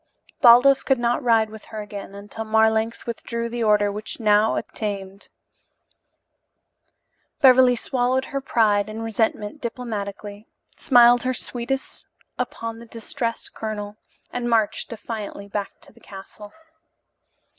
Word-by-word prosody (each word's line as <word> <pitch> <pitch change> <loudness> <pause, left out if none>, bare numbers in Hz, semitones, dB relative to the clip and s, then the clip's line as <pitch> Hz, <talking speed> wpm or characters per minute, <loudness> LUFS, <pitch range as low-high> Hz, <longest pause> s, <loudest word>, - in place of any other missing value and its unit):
Baldos 250 +3 +7
could 270 - +2
not 240 +3 0
ride 225 -4 +2
with 220 -1 -11
her 220 - -8
again 200 -1 -8
until 205 +2 -7
Marlanx 220 +1 +1
withdrew 235 0 -4
the 235 0 -3
order 210 -1 +3
which 215 +4 -6
now 215 0 +3
obtained, 200 -2 -5 2.1
Beverly 255 -2 +6
swallowed 255 +2 0
her 275 - -1
pride 215 -5 +2
and 220 +1 -6
resentment 220 +3 -2
diplomatically, 210 -3 -6 0.3
smiled 245 -3 +5
her 255 0 -1
sweetest 255 +3 -4 0.3
upon 230 0 -4
the 235 - -12
distressed 230 +1 -4
colonel, 210 -1 -5 0.4
and 245 -1 -2
marched 225 -3 +1
defiantly 215 -3 -7
back 200 0 -5
to - - -17
the - - -20
castle. 205 +1 -12
225 Hz, 125 wpm, -23 LUFS, 210-240 Hz, 2.1 s, Baldos